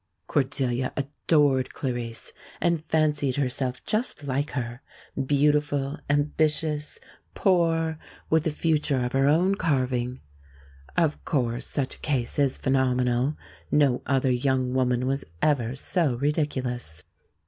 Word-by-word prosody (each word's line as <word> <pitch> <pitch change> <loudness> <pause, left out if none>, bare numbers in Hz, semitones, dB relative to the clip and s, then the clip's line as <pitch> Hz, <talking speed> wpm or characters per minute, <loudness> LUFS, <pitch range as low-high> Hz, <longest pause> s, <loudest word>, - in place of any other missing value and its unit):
Cordelia 130 -2 0
adored 140 -1 +1
Clarice 120 -4 -4 0.3
and 170 -3 +1
fancied 150 -4 +1
herself 130 -2 -1
just 215 -7 -1
like 140 +2 -1
her 120 -2 -4 0.5
beautiful, 145 -1 +2
ambitious, 150 +1 +1 0.4
poor, 165 -4 +2 0.3
with 160 0 +2
a - - +3
future 150 -4 +1
of 125 - -2
her 135 +1 +3
own 175 +6 +4
carving. 130 -7 0 0.8
Of 160 -3 +1
course 120 -5 -1
such 135 -3 -2
a - - -25
case 135 -3 -1
is 140 -2 +2
phenomenal. 130 +1 +1 0.3
No 140 -4 +3
other 135 -1 +2
young 130 0 +1
woman 125 -1 +1
was 135 +1 -1 0.2
ever 130 - +1
so 150 -1 0
ridiculous. 130 - -1
140 Hz, 115 wpm, -26 LUFS, 125-150 Hz, 0.8 s, own